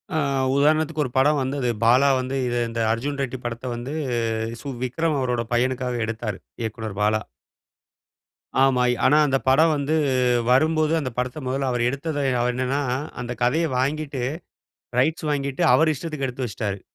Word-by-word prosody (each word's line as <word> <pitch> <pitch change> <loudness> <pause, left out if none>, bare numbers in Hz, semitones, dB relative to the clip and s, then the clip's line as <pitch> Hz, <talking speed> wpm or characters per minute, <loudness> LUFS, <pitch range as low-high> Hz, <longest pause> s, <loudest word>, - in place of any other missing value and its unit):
ஆ. - - +2 0.4
உதாரணத்துக்கு 155 +1 +2
ஒரு 125 - -6
படம் 145 +2 +4
வந்தது. 130 -1 -1
பாலா 125 +5 +5
வந்து 130 +1 -3
இத 120 - -1
இந்த 115 0 -3
அர்ஜுன் 140 +5 -2
ரெட்டி 130 0 -4
படத்த 120 +1 -4
வந்து 120 +4 -5 0.7
சு 145 - -7 0.2
விக்ரம் 150 +4 0
அவரோட 125 -2 -1
பையனுக்காக 125 0 0
எடுத்தாரு. 110 -3 -4 0.2
இயக்குனர் 110 -2 -5
பாலா. 110 +1 +2 1.4
ஆமா. 130 -2 +3 0.2
ஆனா, 150 - +5
அந்த 135 -1 +2
படம் 155 +5 +5
வந்து 145 +2 0 0.6
வரும்போது 155 +3 +3
அந்த 130 -3 -3
படத்த 125 +4 -2
மெதல்ல 135 +1 -1
அவரு 120 -1 +1
எடுத்தத 145 +3 -3 0.2
அவரு 125 +1 +1
என்னன்னா, 130 +3 0 0.4
அந்த 120 0 -5
கதைய 155 +8 +2
வாங்கிட்டு 140 0 -2 0.8
ரைட்ஸ் 155 +4 0
வாங்கிட்டு, 140 +1 -1
அவரு 160 0 +4
இஷ்டத்துக்கு 155 -2 -4
எடுத்து 125 0 -4
வச்சிட்டாரு. 100 -1 -4
130 Hz, 150 wpm, -23 LUFS, 120-145 Hz, 1.4 s, பாலா